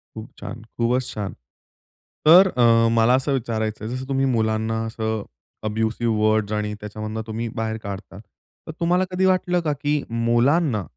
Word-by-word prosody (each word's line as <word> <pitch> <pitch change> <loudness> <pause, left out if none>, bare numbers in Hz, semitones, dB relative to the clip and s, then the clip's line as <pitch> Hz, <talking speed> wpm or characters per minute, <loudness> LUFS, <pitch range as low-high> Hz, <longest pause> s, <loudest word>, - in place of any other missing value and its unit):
खूप 110 0 -8
छान. 115 0 -7 0.2
खूपच 120 +2 +1
छान. 105 -2 -4 0.9
तर 180 +5 +9
अ, 115 -1 +5
मला 115 +1 +4
असं 135 +2 0
विचारायचंय 110 -4 -2
जसं 130 +2 -5
तुम्ही 135 0 +1
मुलांना 110 0 0
असं 110 -2 -3 0.4
अब्युसिव 110 +2 -1
वर्ड्स 110 -1 +2
आणि 105 0 -2
त्याच्यामधून 110 +1 -5
तुम्ही 115 +1 -3
बाहेर 110 -1 -2
काढता. 100 -1 -7
तर 115 - -15
तुम्हाला 175 +2 +2
कधी 185 +1 +1
वाटलं 180 -1 +2
का, 150 -3 0
की 145 +1 -1
मुलांना, 120 - +2
115 Hz, 150 wpm, -23 LUFS, 110-135 Hz, 0.9 s, तर